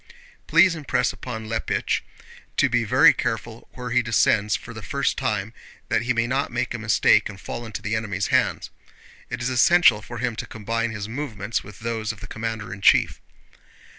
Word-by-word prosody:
Please 185 -2 +5
impress 125 -6 0
upon 110 -3 -7
Leppich 115 0 -1 0.6
to - - +4
be 120 0 +1
very 130 +7 +6
careful 115 +1 -4
where 125 -1 -6
he 125 +1 +3
descends 105 -2 +2
for 115 - -8
the 110 - -8
first 140 +9 -1
time, 110 -4 -2 0.4
that - - +2
he 120 +2 -1
may 115 -1 +1
not 135 +4 -1
make 120 - -2
a 120 - -4
mistake 110 -1 +3
and 100 -2 -10
fall 120 +3 -6
into 105 -2 -7
the 110 +1 -1
enemy's 100 -3 -2
hands. - - +1 0.6
It 120 - -4
is 125 - 0
essential 130 -2 +5
for 120 +3 -8
him 120 -1 -2
to - - -5
combine 115 +2 -2
his 105 -2 -5
movements 115 -4 -4
with 105 +1 -13
those 110 -1 -2
of 110 - -12
the - - -9
commander 110 -3 -5
in 100 - -10
chief. - - +4
115 Hz, 190 wpm, -23 LUFS, 105-125 Hz, 0.6 s, very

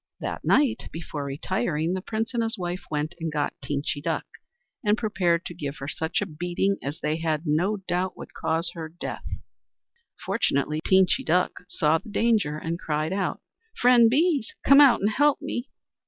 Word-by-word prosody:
That - - -4
night, 255 -6 +2
before 160 -3 -5
retiring, 160 +3 -1
the 185 - -2
Prince 225 +4 -3
and 235 - +1
his 225 0 -1
wife 180 0 -4
went 150 +2 -2
and 165 -1 -3
got 150 -1 -1
Teenchy 145 +2 -2
Duck, - - -2 0.6
and 210 0 +3
prepared 185 -7 +1
to - - -5
give 145 -4 -5
her 140 - -6
such 160 +5 -1
a - - 0
beating 175 +4 -1
as 145 +4 -5
they 150 +1 0
had 160 -2 -1
no 175 +8 +1
doubt 180 +1 -1
would - - -10
cause 165 +1 0
her 160 -2 -6
death. 170 +3 -6 1.0
Fortunately, 150 +3 0
Teenchy 190 +7 +4
Duck 180 -6 +2 0.2
saw 160 -1 +2
the - - -13
danger 210 -8 +1
and 165 +2 -3
cried 155 +1 -1
out: 195 0 -2 0.4
"Friend 240 -2 +6
Bees! 290 -1 +1
come 275 +1 +8
out 275 -4 +6
and 205 - +3
help 290 +5 +3
me." 245 +3 -4
175 Hz, 175 wpm, -26 LUFS, 155-215 Hz, 1.0 s, come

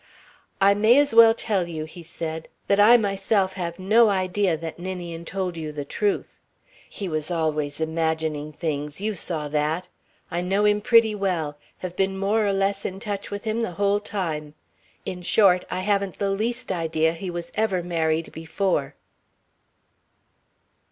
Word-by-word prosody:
"I 195 +1 +6
may 220 +5 +5
as 290 -2 +3
well 225 0 +8
tell 200 -7 0
you," 160 -2 -5
he 170 +3 -11
said, 160 -1 -6 0.2
"that 200 0 +2
I 225 +4 +8
myself 195 -2 +1
have 170 -3 -4
no 215 +4 +4
idea 185 -2 +1
that 165 +1 -7
Ninian 175 -2 -6
told 185 -1 -3
you 155 -2 -5
the 145 -1 -5
truth. 205 +5 -2 0.5
He 200 - -5
was 155 -1 -2
always 155 -4 -1
imagining 160 -2 -1
things 150 -1 -4
you 215 +2 -1
saw 160 -6 -4
that. 155 +4 -1 0.4
I 175 - -1
know 195 +3 +1
him 210 0 +3
pretty 230 -1 +5
well 180 -7 -1 0.2
have 180 -1 -6
been 195 0 0
more 205 +3 +1
or - - +2
less 195 0 0
in 190 +1 -4
touch 205 -2 -4
with 205 0 -5
him 220 +1 -1
the 205 -6 -2
whole 200 +2 +1
time. 160 -8 -4 0.5
In 180 -1 -5
short, 180 0 +4
I 185 - -2
haven't 200 -1 0
the 200 -1 0
least 225 +4 -2
idea 160 -2 +1
he 180 +3 -6
was 170 -1 -5
ever 195 -5 0
married 165 -2 -1
before." 165 -2 -2
185 Hz, 165 wpm, -24 LUFS, 160-200 Hz, 0.5 s, well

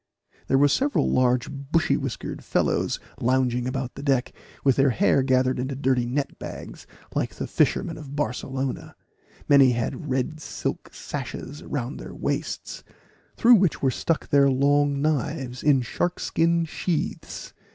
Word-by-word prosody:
There 135 - +3
were 145 +1 +6
several 270 - +1
large 125 -1 +2
bushy 140 +4 0
whiskered 135 -6 -4
fellows - - 0 0.2
lounging 125 0 +1
about 130 -1 -3
the - - -8
deck, 135 -3 +1 0.3
with 135 -3 +4
their 135 0 +4
hair 140 - +3
gathered 130 -1 +2
into 130 +2 -2
dirty 130 -2 +1
net 140 +3 -2
bags, - - -8 0.3
like - - -2
the - - -4
fishermen - - 0
of 145 -2 -9
Barcelona; 135 -2 -3 0.5
many 135 -3 +6
had 120 +6 -3
red 135 +4 -1
silk - - -4
sashes 145 +3 -6
round 135 -1 -4
their - - -9
waists, - - -3 0.5
through 240 +2 +7
which 190 -7 +1
were 135 - +3
stuck 165 +5 -1
their 140 -1 +5
long 140 +1 +2
knives, 140 -4 -1
in 140 -4 +4
shark 175 +8 -2
skin 170 0 +1
sheaths. 165 0 -3
135 Hz, 145 wpm, -25 LUFS, 130-150 Hz, 0.5 s, through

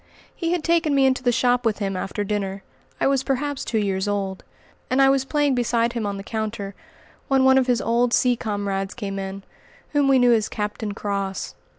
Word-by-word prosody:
He 335 -1 -2
had 350 -3 0
taken 330 -3 +2
me 270 -1 +4
into 260 -1 +2
the 245 -1 +2
shop 245 +1 +2
with 225 -3 +1
him 195 -2 -2
after 195 +2 -3
dinner, 195 -1 -3 0.4
I - - +1
was 275 -1 +3
perhaps 275 +1 -2
two 230 - -2
years 195 -2 0
old, 195 -2 -2 0.5
and 255 - +1
I 270 0 +6
was 270 -1 +1
playing 290 0 +1
beside 235 -1 +1
him 230 -3 -2
on 200 0 -3
the 195 - -7
counter 215 -2 -4 0.5
when 270 -1 +3
one 265 0 +6
of 260 - 0
his 245 -2 +2
old 235 +1 +2
sea 250 0 +3
comrades 200 -3 -3
came 195 -4 -4
in, 195 0 -6 0.5
whom 290 -2 +2
we 270 -1 +5
knew 245 -1 +5
as 220 -2 +1
"Captain 210 0 -3
Cross." 200 -2 -3
230 Hz, 210 wpm, -23 LUFS, 200-265 Hz, 0.5 s, I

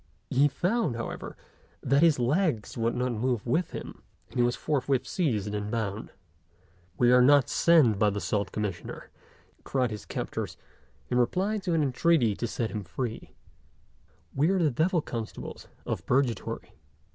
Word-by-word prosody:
He 140 +3 +5
found, 180 - 0
however, 115 - -6 0.5
that 140 +2 +3
his 165 -3 +5
legs 130 - 0
would 115 0 0
not 125 0 0
move 120 -1 -1
with 160 +8 +1
him, - - -8 0.3
and - - -7
he - - +5
was 120 0 +1
forthwith 135 -3 0
seized 110 - -1
and 105 0 -3
bound. 110 -2 -3 0.9
"We 120 0 +4
are 125 0 +7
not 140 +1 +5
sent 145 -12 +4
by 105 - +4
the 100 0 -3
Salt 100 -1 -1
Commissioner," 105 -4 -5 0.5
cried 130 -3 0
his 105 -2 -7
captors, - - -4 0.5
in 125 - +3
reply 190 - +1
to 185 -4 -1
an 155 - +2
entreaty 135 -4 +2
to 120 - -2
set 115 0 -3
him 105 -2 -4
free; 115 +5 -5 1.0
"we 150 +5 +2
are 195 - +2
the 160 -5 +2
devil 165 +6 +1
constables 115 -2 -6 0.2
of - - -3
Purgatory." 125 -4 -1
125 Hz, 155 wpm, -28 LUFS, 115-155 Hz, 1.0 s, are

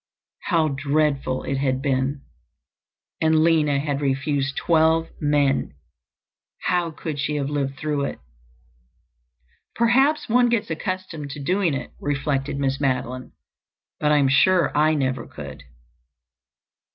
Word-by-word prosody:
How 165 -5 +2
dreadful 140 -1 0
it 135 -1 -2
had 130 -1 0
been! 135 0 -1 1.0
And 160 0 +4
Lina 155 -4 +3
had 140 0 -2
refused 140 0 -1
twelve 160 0 +2
men! 145 - +1 0.9
How 175 -2 +1
could 155 -1 -6
she 145 +2 -1
have 145 -1 -2
lived 135 -2 -2
through 150 -2 -1
it? - - -5 1.6
"Perhaps 270 +6 +3
one 245 +1 +4
gets 225 -6 0
accustomed 165 -3 -4
to 145 - -7
doing 175 +1 +1
it," - - -6
reflected 140 -1 -1
Miss 135 0 -1
Madeline. 130 -2 -2 0.7
"But 150 - +2
I 150 - +5
am 140 -2 +3
sure 170 +7 +3
I 155 +1 +3
never 130 -4 -1
could." 70 -2 -10
145 Hz, 125 wpm, -23 LUFS, 135-160 Hz, 1.6 s, I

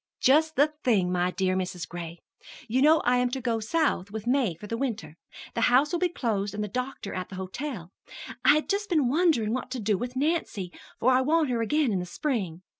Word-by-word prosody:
"Just 315 +4 +4
the 295 +2 +3
thing, 195 -8 +2
my 180 0 +1
dear 185 0 0
Mrs. 180 -2 -3
Gray! 170 -1 -7 0.5
You 250 +3 +1
know 310 +3 +5
I 250 +1 +2
am 250 0 +2
to 265 +2 -3
go 235 -3 -1
South 220 - 0
with 215 +1 -6
May 245 -8 +1
for 175 - -11
the 230 - -3
winter. 225 - -4 0.4
The 230 - -2
house 265 +4 +4
will 345 - 0
be 360 0 +2
closed 210 - -2
and 210 - -2
the - - -3
doctor 250 -1 -4
at 185 - -4
the 190 - -8
hotel. 190 - -6 0.5
I 290 - +6
had 305 - 0
just 410 +1 -1
been 305 -8 +2
wondering 285 -8 +2
what 255 0 -3
to 255 -1 -4
do 210 -2 0
with 245 +2 -5
Nancy, 260 - -1 0.3
for 255 - +3
I 255 0 +4
want 305 0 +2
her 235 -2 0
again 285 +2 +1
in 190 - 0
the 180 - -5
spring. 190 - -3
240 Hz, 225 wpm, -27 LUFS, 190-285 Hz, 0.5 s, I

